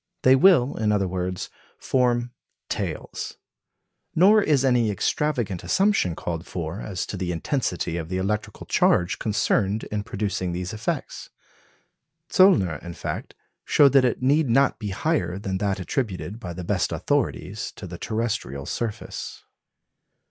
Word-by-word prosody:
They 130 +1 +7
will, 140 -4 +5
in 105 -1 +1
other 100 -2 +1
words, 90 0 -3 0.3
form 120 -2 +1 0.4
"tails." - - -4 0.8
Nor 205 +6 +6
is 145 -7 +2
any 120 -4 +3
extravagant 115 - -1
assumption 195 - +2
called 85 0 -4
for 85 +3 -4
as 95 -4 -4
to - - -6
the 90 -1 -2
intensity 90 - -2
of 80 -1 -5
the 90 - -1
electrical 105 +3 -3
charge 90 0 +2
concerned 105 -1 +1
in 105 0 -1
producing 100 -4 -2
these 90 +2 -4
effects. 110 +1 -4 1.0
Zöllner, 100 - +4
in 85 - -7
fact, - - -5 0.3
showed 140 -3 +5
that 135 -2 +6
it 125 0 0
need 145 +1 +3
not 135 +2 +3
be 105 -2 -4
higher 95 - -1
than 95 -2 -3
that 100 -1 0
attributed 105 0 -3
by 90 -6 -6
the 90 +1 -6
best - - 0
authorities - - -1
to - - -8
the - - -8
terrestrial 110 - -2
surface. 110 +4 -5
105 Hz, 140 wpm, -24 LUFS, 90-130 Hz, 1.0 s, They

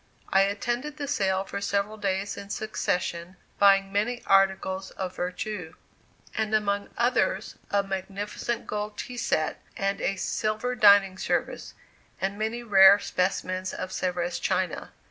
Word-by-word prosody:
I 195 - +6
attended 240 +9 -1
the 285 -2 -4
sale 190 -8 +1
for 200 0 -6
several 200 +1 -1
days 200 -1 -2
in 200 - -9
succession, 180 -4 -2 0.2
buying 195 -1 +5
many 220 +5 -1
articles 190 -1 +2
of 185 -1 -5
vertu, 180 -1 -4 0.6
and, 220 0 0
among 200 -1 0
others, 245 +1 +1 0.2
a 200 0 +2
magnificent 195 +4 -4
gold 210 0 -4
tea 250 - -6
set, 155 -8 -1 0.2
and 195 0 -1
a 195 - 0
silver 215 +5 -1
dining 200 -5 +5
service, - - -2 0.4
and 195 +2 -2
many 225 +2 -2
rare 195 -3 +8
specimens 185 -1 -2
of 185 0 -5
Sevres 175 -2 -2
china. - - -1
200 Hz, 135 wpm, -27 LUFS, 190-215 Hz, 0.6 s, rare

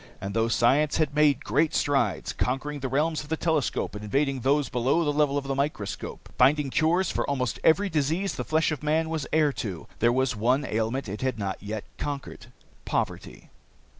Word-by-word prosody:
And 100 +1 -5
though 115 +1 +2
science 135 +6 +3
had 155 -3 +1
made 150 -2 +3
great 155 +2 +1
strides, 135 -9 0
conquering 140 +3 -2
the 135 - -3
realms 155 +4 0
of 150 - -12
the 160 - -1
telescope 160 -6 0
and 105 0 -7
invading 135 +5 0
those 140 +2 +2
below 130 +8 +1
the 145 - +1
level 145 -1 +2
of 140 - -1
the 135 - -1
microscope, 140 -7 -3
finding 140 +2 +4
cures 170 +6 +2
for - - -1
almost 130 -4 -1
every 195 +6 +4
disease 160 +3 0
the - - -4
flesh 160 +1 +1
of 150 - -3
man 160 +2 0
was 160 -3 -2
heir 155 -2 +3
to, 95 -10 -5
there 115 - +4
was 130 0 +1
one 125 +6 +1
ailment 115 +4 -1
it 100 +2 -5
had 130 -3 -1
not 100 -2 -4
yet 105 +1 -5 0.2
conquered 140 -5 -5 0.4
poverty. - - -4
140 Hz, 195 wpm, -26 LUFS, 120-150 Hz, 0.4 s, finding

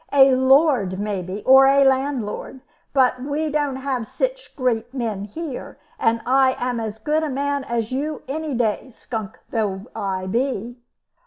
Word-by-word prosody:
"A 270 -1 +6
lord 260 - +3
maybe, 200 -1 -3
or 265 +1 +7
a 275 0 +5
landlord. 265 -2 -1 0.3
But 255 -2 +2
we 295 +3 -2
don't 290 -2 0
have 260 -4 -3
sich - - -3
great 240 -3 -1
men 220 -6 -2
here, 290 +5 -7 0.2
and 225 0 +1
I 260 +1 +4
am 245 -1 -2
as 220 -1 -4
good 300 +8 0
a 310 - -2
man 280 +1 -1
as 230 -2 -2
you 295 +4 -3
any 300 0 -3
day, 235 +2 -1
skunk 220 -4 -6
though 205 -3 -1
I 190 -1 -2
be." 240 +2 -2
255 Hz, 155 wpm, -22 LUFS, 220-280 Hz, 0.3 s, or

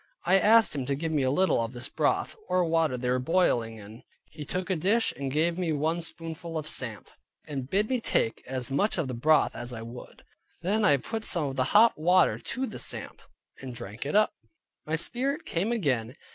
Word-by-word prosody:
I 195 - +5
asked 225 +3 +5
him 130 -3 -3
to 140 - 0
give 160 +3 -3
me 150 -3 +1
a 130 - +2
little 185 -2 +2
of 115 +2 -4
his 120 0 -7
broth, - - 0
or 180 -1 +2
water 160 -5 +1
they 125 0 -3
were 125 - +1
boiling 125 -7 +1
in; 110 +2 -12 0.3
he 150 - -8
took 185 +6 -3
a - - +2
dish, 200 +8 +1
and 140 -1 -4
gave 165 +4 +1
me 175 -3 0
one 160 +3 0
spoonful 165 0 -5
of 155 -1 -4
samp, 115 -8 -4 0.4
and 135 -4 -5
bid 205 +5 +1
me 255 -1 -1
take 115 - 0
as 130 -1 -3
much 200 +11 +1
of 165 -5 -1
the 130 - -4
broth 150 +6 +3
as 120 +1 -4
I 115 -1 -6
would. 120 +2 -11 0.4
Then 210 +5 +1
I 145 -9 +5
put 220 - -5
some 170 -7 +2
of 135 -2 -3
the 130 -1 +1
hot 220 -3 +5
water 180 +2 +4
to 260 - -3
the - - -6
samp, - - -4 0.4
and 130 -2 -8
drank 115 -1 -7
it 150 - -2
up, 215 +6 +4
and - - -36 0.4
my - - +4
spirit 255 - -1
came 190 +7 -1
again. 130 - -1
155 Hz, 220 wpm, -28 LUFS, 125-185 Hz, 0.4 s, I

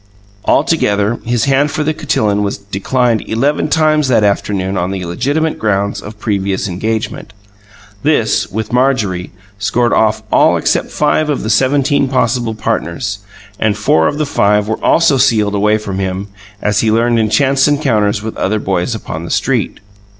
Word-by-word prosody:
Altogether 115 -8 +1
his 120 -1 0
hand 140 +2 +2
for 155 +1 -2
the 155 +1 0
cotillon 125 -10 0
was 100 -1 -2
declined 110 +4 -1
eleven 140 +7 0
times 155 -1 +2
that 120 -4 +3
afternoon 100 -1 0
on 90 0 -1
the 95 -2 -4
legitimate 145 - -1
ground 100 -1 -1
of 105 +1 -9
previous 100 -3 -1
engagement. 110 +3 -4 0.7
This, - - +1
with 110 +3 -4
Marjorie, 115 -9 0 0.3
scored 115 +3 +1
off 110 0 +1
all - - +4
except - - 0
five 150 +1 +1
of 145 - -1
the 110 - -1
seventeen 135 +4 +2
possible 120 -3 0
partners; 100 0 -3 0.4
and 110 -1 +1
four 80 -6 +2
of 145 - -2
the 155 - 0
five 105 -6 +1
were 110 - -3
also 165 -5 +3
sealed 105 -5 +2
away 105 +1 +2
from 100 -3 -5
him, 95 +1 -3 0.3
as 105 0 +1
he 110 - +2
learned 115 +1 +2
in 110 -1 +1
chance 135 +5 +3
encounters 110 -9 +1
with 110 - -5
other 110 +3 0
boys 95 +2 -1
upon 80 -6 -6
the 85 - -7
street. - - -1
110 Hz, 165 wpm, -14 LUFS, 100-135 Hz, 0.7 s, all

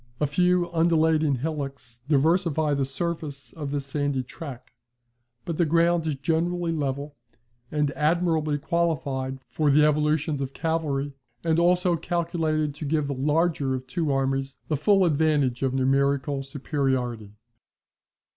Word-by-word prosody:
A 150 - +2
few 175 +3 +1
undulating 160 -3 +3
hillocks 135 -4 -5
diversify 160 0 +2
the 140 -1 +1
surface 145 0 -4
of 150 -3 -5
this 140 -1 -2
sandy 140 -1 -1
track; 130 -1 -9 0.7
but 165 - -3
the 175 - +3
ground 170 +1 +2
is 155 - 0
generally 165 +4 0
level, 145 -1 -3 0.5
and 150 -1 0
admirably 155 -1 +1
qualified 145 -5 -1
for 150 +3 +1
the 150 +2 +5
evolutions 150 0 +1
of 135 0 -4
cavalry, 150 -4 -1 0.3
and 165 0 +2
also 175 0 +3
calculated 160 -3 -1
to 150 +2 -7
give 150 0 +1
the 140 - -2
larger 145 0 +1
of 130 0 -6
two 150 +3 -1
armies 135 0 -1
the 155 - +2
full 190 +6 +4
advantage 145 -5 +2
of 135 -1 +1
numerical 140 +1 +1
superiority. 130 -6 -2
150 Hz, 135 wpm, -25 LUFS, 135-165 Hz, 0.7 s, the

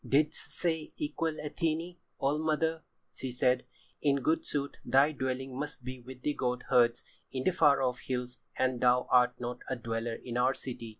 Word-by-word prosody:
"Didst 150 +2 +1
say 160 -3 -1
equal 155 +2 -1
Athené? 160 +3 -2 0.2
old 145 +3 +1
mother," 160 +1 +1 0.3
she 130 - -4
said. 125 +1 +2 0.4
"In 140 -2 +3
good 160 +4 +1
sooth 140 -1 -2
thy 135 +3 +5
dwelling 130 -2 -3
must 145 -3 -4
be 130 0 -6
with 125 +1 -11
the 150 - +1
goat 125 -2 -1
herds 120 -1 +4 0.3
in 130 -1 -2
the 185 - +3
far 140 -6 +4
off 125 -1 0
hills 125 -1 -4 0.2
and 130 -2 +1
thou 125 0 +4
art 125 0 +5
not 125 0 -4
a 130 - 0
dweller 115 -1 -3
in 120 0 -5
our 130 +2 +3
city. 120 -3 -6
130 Hz, 180 wpm, -31 LUFS, 125-150 Hz, 0.4 s, thy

